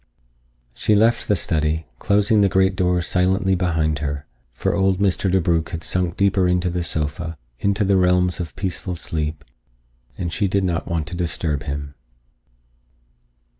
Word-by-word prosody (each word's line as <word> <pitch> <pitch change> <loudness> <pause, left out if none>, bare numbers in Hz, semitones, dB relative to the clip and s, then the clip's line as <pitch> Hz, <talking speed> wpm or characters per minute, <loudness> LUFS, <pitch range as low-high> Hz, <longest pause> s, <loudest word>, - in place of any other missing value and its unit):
She 105 - +1
left 115 +3 +3
the 105 - +3
study, 80 -3 0
closing 105 +1 +3
the 100 - +4
great 95 0 +2
door 90 -2 +1
silently 95 +2 +1
behind 80 -4 0
her, 70 0 -3 0.3
for - - -1
old 95 -1 +2
Mr. 95 -1 +1
DeBrugh 85 -3 +1
had 80 -1 -5
sunk 90 +1 -1
deeper 100 -2 +3
into 90 0 +1
the 90 0 -2
sofa, 80 +1 -3 0.2
into 100 +1 +1
the 95 0 +3
realms 90 0 +2
of 85 -3 -5
peaceful 90 -1 -3
sleep, 75 -2 -3 0.7
and 85 -1 -3
she 105 - +1
did 100 +1 +1
not 85 -3 -1
wish 85 -3 -1
to 85 +3 -6
disturb 80 -3 -2
him. 70 -1 -4
90 Hz, 155 wpm, -21 LUFS, 80-95 Hz, 0.7 s, the